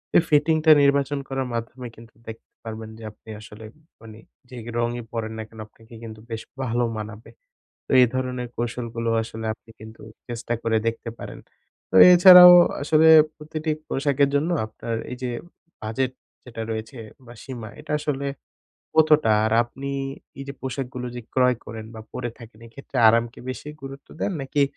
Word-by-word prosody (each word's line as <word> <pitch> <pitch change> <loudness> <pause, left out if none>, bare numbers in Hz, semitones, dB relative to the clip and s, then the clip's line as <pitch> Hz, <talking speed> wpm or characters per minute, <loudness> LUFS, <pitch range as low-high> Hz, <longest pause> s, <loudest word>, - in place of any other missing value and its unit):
এই - - +7
ফিটিংটা 155 +1 +3
নির্বাচন 140 0 +2
করার 135 -1 -3
মাধ্যমে 120 +2 -5
কিন্তু 115 -1 -16
দেখতে 110 0 -11
পারবেন 110 -1 -7
যে 115 - -12
আপনি 105 - -20
আসলে 105 +1 -12 0.4
মানে 110 -1 -12 0.3
যে 125 - -10 0.2
রংই 120 0 -2
পরেন 110 -1 -4
না 110 - -5
কেন 110 - -15
আপনাকে 115 +2 -20
কিন্তু 110 -1 -9
বেশ 110 0 -4 0.2
ভালো 120 -1 0
মানাবে। 110 +1 -8 0.6
তো - - -18
এই - - +6
ধরনের 125 -1 -3
কৌশলগুলো 115 -1 -3
আসলে 110 0 -7
আপনি 115 - -23
কিন্তু 110 +1 -12 0.3
চেষ্টা 120 0 -4
করে 115 -1 +1
দেখতে 115 0 -3
পারেন। - - -9 0.5
তো - - -11 0.2
এছাড়াও 180 0 +10 0.3
আসলে 155 +2 +4 0.3
প্রতিটি 155 +1 -5 0.2
পোশাকের 140 0 +1
জন্য 150 +4 +1 0.2
আপনার 115 +1 -6 0.2
এই 125 - -5
যে 125 - -2 0.5
বাজেট 120 +4 -2 0.3
যেটা 115 -2 -7
রয়েছে 110 +3 -6 0.3
বা 120 - -12
সীমা 120 -5 -8
এটা 150 0 -7
আসলে 140 -2 -3 0.7
কতটা? 155 -7 +4
আর 110 - 0
আপনি 135 +3 -7 0.5
এই 135 - -6
যে - - -4
পোশাকগুলো 130 -1 -5
যে - - -5
ক্রয় 125 -1 +3
করেন 110 -1 -8
বা 110 - -8
পরে 120 - -4
থাকেন 115 -2 -14
এক্ষেত্রে 135 +4 -11
আরামকে 115 +1 +1
বেশি 130 +3 -8
গুরুত্ব 135 0 -10
দেন 205 - -1
নাকি 135 +1 0
120 Hz, 160 wpm, -23 LUFS, 115-140 Hz, 0.7 s, এছাড়াও